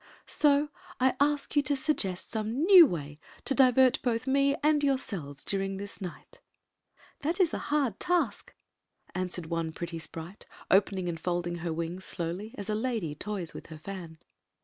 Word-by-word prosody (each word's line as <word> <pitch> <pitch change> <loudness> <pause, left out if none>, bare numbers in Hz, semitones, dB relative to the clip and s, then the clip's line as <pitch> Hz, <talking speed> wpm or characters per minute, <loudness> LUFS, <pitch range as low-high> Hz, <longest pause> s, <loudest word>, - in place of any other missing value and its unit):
So 295 0 +3 0.3
I 260 0 +4
ask 290 +1 +1
you 290 - +6
to 285 +1 0
suggest 265 - -2
some 220 +6 -1
new 360 -3 +9
way 150 - -5 0.3
to - - +2
divert 260 -1 +5
both 235 -1 0
me 275 +1 +3
and 300 -1 +3
yourselves 195 - -2
during 195 -1 -2
this 200 +1 -7
night" 195 - -9 0.8
"That 330 +6 -1
is 350 -4 +3
a - - -1
hard 280 -8 +1
task," 355 -1 0 0.6
answered 180 -1 -3
one 165 0 -2
pretty 170 0 -5
sprite, 165 +4 -9 0.2
opening 190 -1 +3
and 165 -2 -3
folding 175 0 -2
her 170 0 -3
wings 170 +3 -4
dowly 180 +6 -4
— - - -22
as 200 - -6
a 215 - 0
lady 220 -8 -1
toys 185 +1 -4
with - - -9
her 160 - -9
fan. 170 -1 -8
200 Hz, 170 wpm, -29 LUFS, 175-275 Hz, 0.8 s, new